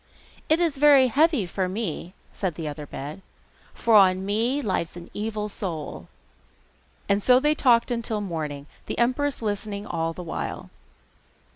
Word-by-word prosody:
'It 315 +2 +4
is 330 -5 +1
very 280 -3 +6
heavy 295 - +3
for 185 +1 -2
me!' 185 -3 -4 0.2
said 185 -6 -2
the 160 -1 -5
other 150 0 -6
bed, 150 +8 -7 0.5
'for 230 - 0
on 190 -2 +5
me 230 +7 0
lies 185 - -2
an 175 0 -11
evil 210 0 -3
soul.' 175 -7 -6 1.0
And 200 +1 +2
so 250 +4 +5
they 295 +3 +3
talked 245 -5 +3
on 235 -1 0
till 220 -1 -1
the 205 - -3
morning, 150 -5 -4 0.2
the - - -4
empress 255 +2 0
listening 205 -1 -3
all 165 -5 -2
the 180 +2 -8
while. 165 - -5
205 Hz, 160 wpm, -25 LUFS, 175-250 Hz, 1.0 s, very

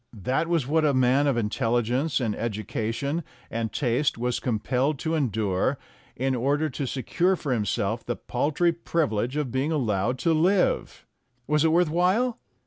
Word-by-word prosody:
That 130 - 0
was 165 -6 +1
what 155 +4 +2
a 145 -3 +3
man 130 +3 +3
of 135 -4 +1
intelligence 120 +6 0
and 115 -5 -1
edu 110 -2 -4
cation 140 +9 -2 0.3
and 115 -1 -2
taste 130 +1 0
was 120 +1 -1
compelled 130 +5 0
to 160 +4 -2
endure 110 - 0 0.4
in 135 +1 0
order 140 +5 0
to 135 +1 -3
secure 170 +9 +1
for 145 -6 -2
himself 110 0 -1
the 120 - -3
paltry 150 +7 0
privilege 145 -8 -1
of 145 -5 -1
being 135 +5 0
allowed 120 -4 0
to 165 +5 +1
live. 180 +4 +1 0.4
Was 150 +2 +2
it 160 - +3
worth 170 -1 +3
while? 190 +9 +2
135 Hz, 160 wpm, -26 LUFS, 120-155 Hz, 0.4 s, a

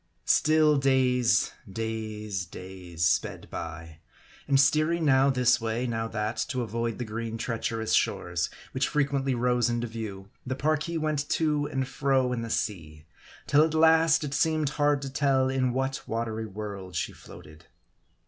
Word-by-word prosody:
STILL 155 -1 +4
days, 125 -4 +3 0.2
days, 110 -3 -4
days 90 -2 -5
sped - - 0
by; 80 -1 -7 0.5
and 140 -1 +4
steering 155 +4 +3
now 135 -1 +5
this 125 -2 +3
way, 115 +2 -1
now 115 -2 -2
that, 110 0 -3
to 130 -4 -2
avoid 115 0 -3
the 125 - -4
green 115 +1 -4
treacherous 115 -1 -2
shores, 85 0 0 0.2
which 130 +1 0
frequently 140 -2 0
rose 120 0 +2
into 120 0 -1
view, 105 -4 -7
the 130 0 -3
Parki 155 +4 0
went 155 -2 -1
to 150 -2 +1
and 135 -2 -2
fro 135 -2 +1
in 120 - -2
the 115 - -5
sea; 75 -9 -3 0.4
till 145 +2 +5
at 160 0 0
last, 160 0 +5
it 145 -2 -4
seemed 155 -1 +1
hard 145 -1 +1
to - - -4
^tell, 135 -1 +1
in 130 -1 +1
what 135 +2 -2
wa 115 +1 -1
tery 110 -1 -5
world 100 -3 -7
she - - -1
floated. 75 +2 -14
125 Hz, 160 wpm, -27 LUFS, 110-140 Hz, 0.5 s, now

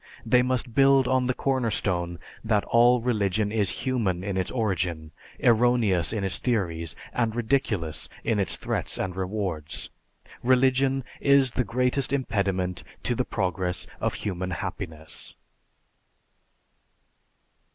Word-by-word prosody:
They 125 - +4
must 125 -1 -1
build 135 0 +5
on 130 -1 +2
the 130 - +1
corner 130 -4 0
stone 85 -5 -1 0.3
that 110 -2 +1
all 120 +1 +4
religion 105 -3 0
is 105 -4 0
human 105 -9 0
in 100 -1 -3
its 95 -1 -1
origin, 90 -9 -2 0.3
erroneous 115 -7 +3
in 110 -3 -2
its 95 -2 0
theories, 85 -9 -1 0.2
and 115 -2 0
ridiculous 110 - -1
in 110 -3 +1
its 95 - +1
threats - - -2
and 95 -1 -3
rewards. 95 -5 -3 0.5
Religion 130 +1 +3 0.2
is 140 -2 +5
the 125 - 0
greatest 125 +3 0
impediment 100 -9 -1 0.2
to 125 - +1
the 125 - 0
progress 90 -3 -2
of - - -1
human 95 -3 -3
happiness. 90 -4 -5
110 Hz, 125 wpm, -26 LUFS, 90-125 Hz, 0.5 s, build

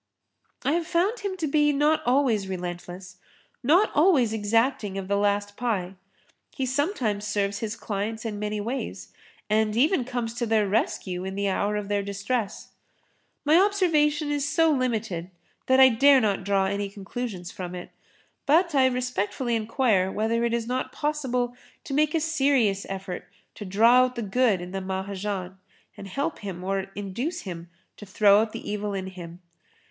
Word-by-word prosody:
I 275 - +3
have 335 +1 0
found 390 +8 +1
him 395 -2 -4
to 335 - -2
be 295 0 +3
not 295 +2 +2
always[Pg 245 -5 +2
28] - - -9
relentless, 180 0 -6 0.4
not 345 - +4
always 290 - +4
exacting 220 -1 0
of 195 -1 -4
the 200 - +1
last 205 0 0
pie. 205 -7 -2 0.6
He 265 - -3
sometimes 255 - -1
serves 200 -1 -1
his 220 -1 -3
clients 220 +2 -4
in 210 -2 -4
many 210 0 -2
ways 240 +6 -5 0.3
and 215 0 +1
even 290 +3 +3
comes 240 -2 -3
to 235 0 -2
their 215 -2 +2
rescue 190 -3 -1
in 190 0 -5
the 200 0 0
hour 205 +2 0
of 210 -1 -3
their 205 0 0
distress. 200 +2 -3 0.8
My 310 +4 +6
observation 310 -7 +2
is 285 -1 0
so 325 -1 +3
limited 220 - -1 0.4
that 260 0 +4
I 265 0 +9
dare 270 +4 +6
not 205 -5 0
draw 195 0 +2
any 200 +1 -2
conclusions 200 -2 -6
from 180 -1 -6
it, 175 - -8 0.6
but 335 +4 +4
I 265 -2 +5
respectfully 250 -1 -1
enquire 220 -4 +1
whether 225 +3 0
it 235 - +1
is 235 -1 -2
not 250 +2 -2
possible 255 -5 -1 0.3
to 275 - -6
make 300 +2 +2
a - - +3
serious 270 -10 +1
effort 190 -1 -6 0.3
to 210 - -8
draw 225 +6 +5
out 255 0 -5
the 235 - -3
good 210 -2 +2
in 180 0 -7
the 195 0 -3
Mahajan 190 0 -4 0.4
and 195 - -9
help 280 - -3
him 185 -3 -6
or 195 0 -2
induce 205 - -4
him 175 -3 -8 0.3
to 210 - -11
throw 200 +1 +5
out 220 0 -2
the - - -8
evil 205 -1 -3
in 190 -1 -3
him. 175 -2 -9
220 Hz, 175 wpm, -26 LUFS, 195-265 Hz, 0.8 s, I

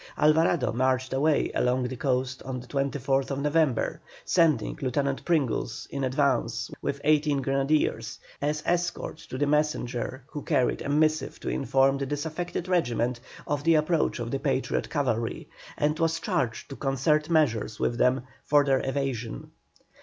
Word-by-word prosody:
Alvarado 155 -3 +3
marched 130 +1 +1
away 145 +3 +2
along 125 +1 +1
the 125 +1 -3
coast 130 +1 -1
on 130 -1 -5
the 125 - -10
24th 135 0 -1
November, 150 -3 +1 0.2
sending 160 -10 +2
Lieutenant 135 +1 -1
Pringles 135 -8 0
in 140 -1 -3
advance 130 -1 0
with - - -2
eighteen 150 -2 +3
grenadiers, 135 -4 0 0.2
as 150 +1 -1
escort 175 -2 -1
to - - -9
a 145 +3 +1
messenger 145 -4 -1
who 145 +1 -7
carried 125 -2 +1
a - - -4
missive 155 -1 +1
to - - -3
inform 135 0 +2
the 140 - -2
disaffected 160 +5 -3
regiment 125 -9 0 0.3
of 145 -1 -2
the 165 +1 +4
approach 155 +1 +1
of 120 -1 -4
the 135 - -1
Patriot 135 -2 -1
cavalry, 120 -6 -1 0.3
and 150 +2 +1
was 165 0 +1
charged 155 - -2
to - - -5
concert 150 +3 +1
measures 120 -10 +1
with 120 - 0
them 125 0 +3 0.2
for 145 -1 +4
their 135 -1 +2
evasion. 135 - -3
140 Hz, 150 wpm, -27 LUFS, 130-150 Hz, 0.3 s, the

